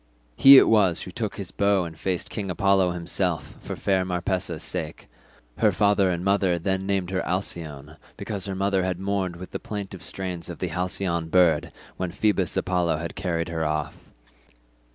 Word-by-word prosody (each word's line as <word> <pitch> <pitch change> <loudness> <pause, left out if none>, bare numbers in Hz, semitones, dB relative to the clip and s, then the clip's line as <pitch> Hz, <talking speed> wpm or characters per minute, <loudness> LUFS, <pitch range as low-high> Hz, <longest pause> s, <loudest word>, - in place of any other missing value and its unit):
He 135 - +9
it - - +7
was 95 -7 +3
who - - -7
took - - -4
his - - -6
bow 100 -2 +2
and 80 -1 -8
faced 90 +2 -3
King 100 -3 -4
Apollo 95 0 +3
himself 85 0 -2
for - - -6
fair 95 -2 +1
Marpessa's 90 0 -2
sake; - - -5 0.5
her - - +4
father 100 -2 +3
and 90 0 -2
mother 100 -3 +2
then 95 +2 -2
named 95 -2 -1
her 95 - 0
Alcyone, 80 -5 -4 0.2
because 100 -3 -4
her 95 - -3
mother 95 0 +1
had 90 -1 -2
mourned 95 -2 -1
with 90 +2 -10
the - - -4
plaintive 100 -3 -6
strains 90 -2 -5
of 85 - -6
the 90 - -3
halcyon 90 -1 -1
bird 85 -4 +3 0.3
when 90 -1 -2
Phoebus 95 -1 0
Apollo 90 -3 +1
had 85 +2 -5
carried 90 -3 -2
her 80 -1 -2
off. 75 -1 -3
90 Hz, 175 wpm, -25 LUFS, 85-95 Hz, 0.5 s, He